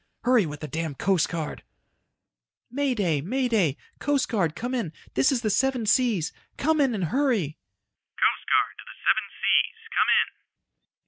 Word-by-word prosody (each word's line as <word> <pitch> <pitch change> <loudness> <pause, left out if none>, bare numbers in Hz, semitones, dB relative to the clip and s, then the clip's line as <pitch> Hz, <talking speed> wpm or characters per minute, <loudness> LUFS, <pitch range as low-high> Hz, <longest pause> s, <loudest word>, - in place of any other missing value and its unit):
Hurry 240 -7 +4
with 150 0 -8
the 155 - -4
damned 160 -3 -4
Coast 190 -4 +2
Guard!" 165 -3 -4 1.1
"May 275 0 0
Day! 170 -9 +1
May 250 - -1
Day! 190 - +1 0.2
Coast 285 -2 +1
Guard 175 -9 0
come 245 +2 -4
in. 225 -11 -2 0.2
This 130 - +3
is 255 -3 0
the 215 - +1
Seven 255 +1 +1
Seas. 215 - +2 0.2
Come 310 +1 +2
in 265 -5 +2
and 195 - -2
hurry!" 215 - 0
215 Hz, 125 wpm, -26 LUFS, 165-255 Hz, 1.1 s, Hurry